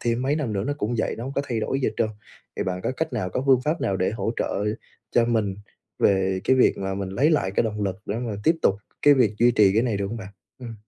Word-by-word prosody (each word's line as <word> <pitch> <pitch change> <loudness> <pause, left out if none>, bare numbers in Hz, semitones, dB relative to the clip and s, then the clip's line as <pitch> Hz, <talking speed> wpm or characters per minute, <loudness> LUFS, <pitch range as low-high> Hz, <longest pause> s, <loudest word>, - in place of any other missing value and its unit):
thêm 120 +1 0
mấy 140 +3 +1
năm 140 -8 -2
nữa 100 -1 -1
nó 145 - -1
cũng 110 0 -1
vậy, - - 0
nó 115 - -6
hông 135 - -5
có 140 - -1
thay 115 -5 -2
đổi 135 +5 -1
gì - - +2
hết - - -7
trơn. 115 - +1 0.5
Thì - - -1
bạn 90 -1 -2
có - - -1
cách 160 -2 -2
nào, 105 -7 -2
có 130 - -2
phương 130 -2 +5
pháp 155 +5 -1
nào 95 - 0
để 95 - 0
hỗ 110 0 -2
trợ 100 - -1 0.5
cho 120 - +4
mình 110 -4 0 0.4
về 95 -1 +2
cái 130 - +4
việc 130 - +4
mà 95 0 -2
mình 100 -1 -4
lấy 135 +11 +2
lại 145 -12 +1
cái 95 - +1
động 105 -2 -3
lực, 95 -2 -1
để 105 - -2
mà 115 -4 -3
tiếp 165 +1 +4
tục 95 - +4 0.3
cái 145 0 +7
việc 120 -6 +2
duy 120 +1 +5
trì 105 -5 +4
cái 110 - +3
này 120 -4 0
được 100 0 -2
hông 115 - -5
bạn? 100 -4 -8 0.3
Ừm. 120 -3 -8
115 Hz, 290 wpm, -24 LUFS, 100-130 Hz, 0.5 s, cái